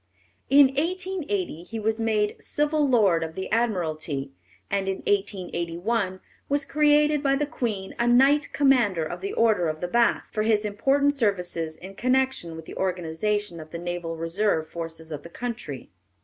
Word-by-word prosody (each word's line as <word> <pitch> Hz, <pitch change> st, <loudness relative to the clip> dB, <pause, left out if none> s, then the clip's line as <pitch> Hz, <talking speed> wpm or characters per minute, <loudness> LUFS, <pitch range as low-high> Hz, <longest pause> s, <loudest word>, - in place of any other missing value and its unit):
In 280 Hz, -1 st, +7 dB
1880 300 Hz, -, -2 dB
he 225 Hz, +6 st, -6 dB
was 220 Hz, +1 st, -1 dB
made 210 Hz, -2 st, 0 dB
Civil 295 Hz, 0 st, +1 dB
Lord 200 Hz, -10 st, +3 dB
of 160 Hz, 0 st, -6 dB
the 190 Hz, 0 st, -5 dB
Admiralty, 160 Hz, -11 st, -1 dB, 0.4 s
and 195 Hz, -1 st, -1 dB
in 190 Hz, -, 0 dB
1881 185 Hz, 0 st, -1 dB, 0.3 s
was 285 Hz, 0 st, +1 dB
created 300 Hz, 0 st, +3 dB
by 275 Hz, -1 st, +2 dB
the 295 Hz, +2 st, 0 dB
Queen 225 Hz, -10 st, -3 dB
a 235 Hz, -, +2 dB
Knight 275 Hz, +4 st, +4 dB
Commander 245 Hz, -, +3 dB
of 155 Hz, -, -5 dB
the 395 Hz, +1 st, -3 dB
Order 220 Hz, -, +3 dB
of 155 Hz, 0 st, -3 dB
the 180 Hz, -, -2 dB
Bath, 235 Hz, +5 st, +2 dB
for 215 Hz, -, -1 dB
his 215 Hz, -1 st, +2 dB
important 275 Hz, +7 st, +2 dB
services 180 Hz, -, -1 dB
in 190 Hz, +2 st, -10 dB
connection 255 Hz, -7 st, 0 dB
with 160 Hz, 0 st, -9 dB
the -, -, -9 dB
organization 185 Hz, +1 st, -1 dB
of 155 Hz, 0 st, -10 dB
the 170 Hz, -, -6 dB
Naval 175 Hz, -1 st, -4 dB
Reserve 165 Hz, 0 st, 0 dB
forces 165 Hz, -1 st, -7 dB
of 150 Hz, -1 st, -5 dB
the 170 Hz, -, -11 dB
country. 225 Hz, -, -6 dB
205 Hz, 165 wpm, -25 LUFS, 170-265 Hz, 0.4 s, In